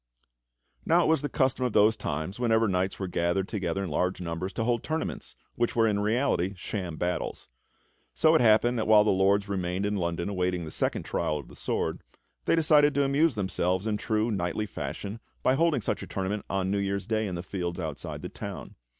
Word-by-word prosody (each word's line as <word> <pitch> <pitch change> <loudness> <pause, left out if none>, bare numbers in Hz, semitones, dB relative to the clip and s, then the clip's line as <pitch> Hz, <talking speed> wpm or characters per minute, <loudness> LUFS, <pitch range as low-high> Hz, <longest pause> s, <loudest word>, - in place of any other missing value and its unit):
Now 170 +2 +4
it - - +1
was 160 -3 +3
the 145 - -2
custom 130 -1 +1
of 125 -4 0
those 110 +2 +5
times, 80 +7 -4
whenever 115 -2 +3
knights 95 0 0
were 95 - -3
gathered 90 +2 0
together 100 -3 -2
in 90 - -4
large 90 +5 0
numbers, 90 +2 -4
to 115 - -1
hold 120 0 +1
tournaments, 160 +1 -4 0.2
which 120 0 -1
were 115 -1 +4
in 105 -2 +1
reality 105 -3 +1
sham 90 -3 -4
battles. 90 +2 -3 0.7
So 160 0 +4
it 160 - +5
happened 120 +1 +4
that 110 - -1
while 105 -1 +7
the 105 - +3
Lords 100 +2 +3
remained 95 -1 -2
in 105 0 0
London 85 -1 -2
awaiting 90 -3 -1
the 80 - -7
second - - -1
trial 75 - -1
of 70 - -9
the - - -13
sword, - - -2 0.4
they - - +3
decided 150 -3 +4
to 140 - +3
amuse 140 +1 +2
themselves 95 -1 0
in 105 -2 0
true 110 +2 0
knightly 95 +2 -1
fashion 100 +2 -5 0.2
by 130 - +4
holding 155 -2 +2
such - - -2
a - - -7
tournament 95 +2 -3
on 95 0 0
New 100 - +1
Year's 100 0 -1
Day 110 -1 0
in 90 - -4
the 85 - -5
fields 90 -2 -4
outside 80 -4 -5
the - - -3
town. - - -7
100 Hz, 210 wpm, -28 LUFS, 90-115 Hz, 0.7 s, while